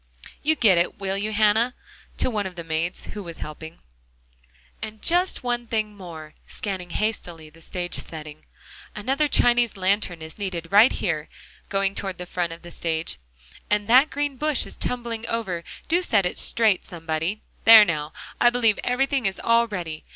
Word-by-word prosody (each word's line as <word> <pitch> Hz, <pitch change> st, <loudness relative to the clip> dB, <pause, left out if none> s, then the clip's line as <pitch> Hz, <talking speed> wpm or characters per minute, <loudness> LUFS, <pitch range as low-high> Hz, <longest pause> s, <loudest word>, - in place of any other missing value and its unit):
You 315 Hz, +2 st, +2 dB
get 200 Hz, -, +5 dB
it, 175 Hz, -, 0 dB
will 195 Hz, -1 st, -2 dB
you, 205 Hz, +2 st, -2 dB
Hannah?" 215 Hz, +3 st, +3 dB, 0.4 s
to -, -, +1 dB
one 210 Hz, -3 st, -1 dB
of 185 Hz, -, -10 dB
the 170 Hz, -, -6 dB
maids 165 Hz, +2 st, -2 dB
who 210 Hz, -, -6 dB
was 170 Hz, -4 st, -8 dB
helping. 160 Hz, +2 st, -8 dB, 1.0 s
"And 215 Hz, 0 st, -6 dB
just 355 Hz, -, +1 dB
one 240 Hz, -1 st, -2 dB
thing 215 Hz, -2 st, -2 dB
more," 165 Hz, -5 st, -10 dB
scanning 190 Hz, -4 st, -5 dB
hastily 175 Hz, -6 st, -3 dB
the 165 Hz, +1 st, -18 dB
stage 175 Hz, +1 st, -4 dB
setting, 155 Hz, -1 st, -6 dB, 0.5 s
"another 270 Hz, +8 st, +1 dB
Chinese 240 Hz, -5 st, +3 dB
lantern 185 Hz, -3 st, 0 dB
is 160 Hz, +6 st, -10 dB
needed 180 Hz, -4 st, -4 dB
right 210 Hz, +5 st, +7 dB
here," 160 Hz, -4 st, -2 dB, 0.4 s
going 195 Hz, 0 st, 0 dB
toward 195 Hz, -2 st, -3 dB
the 180 Hz, -, -6 dB
front 175 Hz, -1 st, -2 dB
of 165 Hz, +1 st, -10 dB
the 175 Hz, -, -10 dB
stage, 160 Hz, -, -3 dB, 0.5 s
"and 210 Hz, 0 st, +1 dB
that 260 Hz, +6 st, +6 dB
green 290 Hz, -2 st, -2 dB
bush 300 Hz, 0 st, 0 dB
is -, -, -9 dB
tumbling 235 Hz, -2 st, -3 dB
over; 190 Hz, -7 st, -2 dB, 0.2 s
do 345 Hz, +2 st, +2 dB
set 220 Hz, -, +2 dB
it 180 Hz, -, -1 dB
straight, 220 Hz, -5 st, +2 dB
somebody; 165 Hz, +4 st, -3 dB, 0.2 s
there 225 Hz, -2 st, +10 dB
now, 155 Hz, -4 st, -2 dB, 0.3 s
I 240 Hz, -, +6 dB
believe 235 Hz, -3 st, +2 dB
everything 265 Hz, -1 st, +1 dB
is 190 Hz, -, -3 dB
all 230 Hz, 0 st, +4 dB
ready. 170 Hz, -7 st, -5 dB
200 Hz, 175 wpm, -24 LUFS, 170-230 Hz, 1.0 s, there